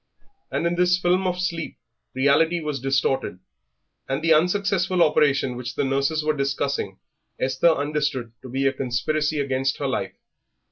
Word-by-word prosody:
And - - -2
in 170 - +1
this 180 +1 +3
film 180 +1 +1
of 180 0 -2
sleep 170 -3 -3 0.4
reality 145 +6 +3
was 150 -3 -3
distorted, 135 -5 0 0.7
and 135 +3 -2
the 165 -1 +5
unsuccessful 185 +1 +2
operation 140 -4 +2
which 125 0 -6
the - - 0
nurses 140 +3 0
were 155 0 +1
discussing 140 -7 -2 0.4
Esther 130 +6 +2
understood 145 -5 -1
to 130 - -10
be 135 +2 -1
a 135 - +3
conspiracy 150 +4 -1
against 135 -1 0
her - - -3
life. - - -2
145 Hz, 150 wpm, -23 LUFS, 135-170 Hz, 0.7 s, the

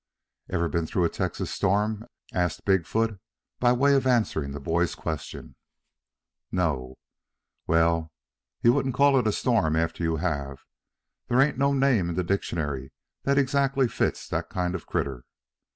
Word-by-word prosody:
"Ever 85 0 0
been 80 +1 -1
through 90 - 0
a - - +2
Texas - - -3
storm?" 105 +3 0 0.3
asked 90 -2 -1
Big 95 -5 +2
foot 110 -2 0 0.4
by 120 -1 +4
way 140 +3 +4
of 135 -1 +2
answering 105 - +1
the 70 - -6
boy's 85 +4 0
question. 80 -4 -6 1.0
"No." 70 -8 -1 0.7
"Well, 80 -1 +2 0.5
you 120 - +6
won't 135 -2 0
call 140 0 +5
it 120 - 0
a - - +3
storm 105 -10 +1
after 80 +1 -1
you 80 -1 +1
have. 70 -5 -3 0.6
There 120 - +2
ain't 135 -1 +3
no 140 +1 +3
name 135 -10 +2
in 85 - -3
the 90 - 0
dictionary 75 -8 -2 0.3
that 140 0 +2
exactly 135 -1 +2
fits - - -1
that - - -2
kind 90 -1 -1
of 95 - -3
a - - -25
critter. 70 -7 -2
90 Hz, 160 wpm, -26 LUFS, 80-125 Hz, 1.0 s, you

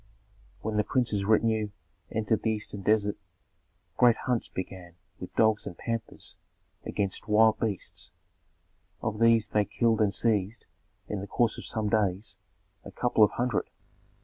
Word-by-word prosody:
When 110 -1 -2
the 105 - +3
prince's 105 -5 +1
retinue 110 0 +2 0.4
entered 110 0 0
the 110 - 0
eastern 105 -2 -3
desert, 105 0 +2 0.8
great 120 -2 +6
hunts 125 -2 0
began 90 -2 -7 0.2
with 90 - -9
dogs 110 -1 +3
and 85 - -7
panthers 115 -1 -4 0.5
against 100 0 -2
wild 110 +1 +4
beasts. 105 -5 -2 0.9
Of 110 -1 -2
these 115 -2 +4
they 105 -1 +2
killed 110 +2 +1
and 105 -2 +3
seized, 105 0 +1 0.4
in 105 - -3
the 100 - -6
course 115 +2 +1
of - - -8
some 110 -1 -2
days, 100 -2 0 0.5
a - - -9
couple 120 -3 +2
of 105 - +6
hundred. 120 -2 -1
110 Hz, 145 wpm, -28 LUFS, 100-115 Hz, 0.9 s, great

